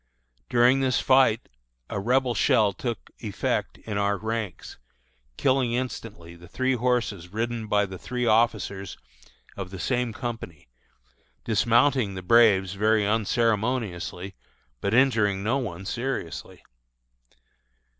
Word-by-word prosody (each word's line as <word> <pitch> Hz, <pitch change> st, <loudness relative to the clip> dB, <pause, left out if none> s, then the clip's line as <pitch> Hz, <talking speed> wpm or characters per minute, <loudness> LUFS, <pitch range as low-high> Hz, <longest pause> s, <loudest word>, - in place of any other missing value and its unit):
During 125 Hz, +2 st, +4 dB
this 130 Hz, -2 st, +1 dB
fight 130 Hz, -4 st, +3 dB, 0.4 s
a -, -, -4 dB
Rebel 125 Hz, +4 st, +1 dB
shell 110 Hz, -1 st, +3 dB
took 120 Hz, +3 st, -5 dB
effect -, -, -2 dB
in 105 Hz, -2 st, -4 dB
our 100 Hz, 0 st, +1 dB
ranks, 110 Hz, -3 st, -5 dB, 0.6 s
killing 130 Hz, -3 st, +2 dB
instantly 110 Hz, -8 st, -5 dB
the 85 Hz, +1 st, -14 dB
three 130 Hz, +8 st, 0 dB
horses 120 Hz, -7 st, -1 dB
ridden 115 Hz, +1 st, -3 dB
by 105 Hz, -1 st, +2 dB
the 95 Hz, -2 st, -9 dB
three 125 Hz, 0 st, -3 dB
officers 105 Hz, -4 st, +1 dB, 0.6 s
of 95 Hz, -2 st, -6 dB
the 95 Hz, -, -8 dB
same 125 Hz, +4 st, -1 dB
company, 110 Hz, -, -7 dB, 0.8 s
dismounting 115 Hz, 0 st, +2 dB
the 95 Hz, -, -6 dB
braves 100 Hz, -3 st, +4 dB
very 105 Hz, +1 st, +2 dB
unceremoniously, 110 Hz, -4 st, -1 dB, 0.5 s
but 100 Hz, -, 0 dB
injuring 110 Hz, -7 st, +3 dB
no 125 Hz, +6 st, +1 dB
one 95 Hz, -7 st, -5 dB
seriously. 120 Hz, -, -4 dB
110 Hz, 115 wpm, -26 LUFS, 100-125 Hz, 0.8 s, During